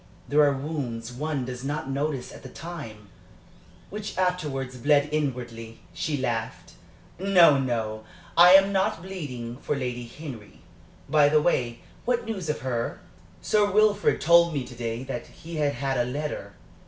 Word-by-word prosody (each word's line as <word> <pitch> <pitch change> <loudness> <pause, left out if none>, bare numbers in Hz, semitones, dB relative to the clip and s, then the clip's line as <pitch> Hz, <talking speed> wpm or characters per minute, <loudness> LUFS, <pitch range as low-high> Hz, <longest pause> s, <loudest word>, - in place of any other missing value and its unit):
There 150 +1 +4
are 140 -2 +3
wounds 125 -6 -4
one 145 0 -2
does 125 0 -6
not 145 0 -3
notice 140 -2 -2
at - - -11
the 130 - -10
time 125 - -9 0.4
" - - -26
"Which 210 +1 -6
afterwards 150 -9 -1
bleed 145 +3 +3
inwardly?" 120 -6 -3
She 155 -4 -2
laughed. 120 -4 -3 0.5
"No, 180 -7 +6
no, 110 -4 -2 0.3
I 175 +2 +9
am 195 +1 +6
not 190 -3 0
bleeding 130 -11 -6
for 145 - -2
Lady 125 -3 -4
Henry. 120 -5 -10 0.5
By 150 -2 +5
the 155 +1 +4
way, 120 -7 0 0.2
what 245 -1 0
news 195 -8 -4
of 150 -6 -2
her?" 120 -3 -2 0.4
"Sir 210 -1 +3
Wilfrid 210 0 +3
told 170 -1 +5
me 135 - -1
to - - -11
day 115 +1 -4
that 125 -3 -5
he 165 0 -9
had 145 -2 +1
had 135 +1 -1
a 120 0 0
letter. 150 +3 -4
145 Hz, 160 wpm, -26 LUFS, 125-165 Hz, 0.5 s, I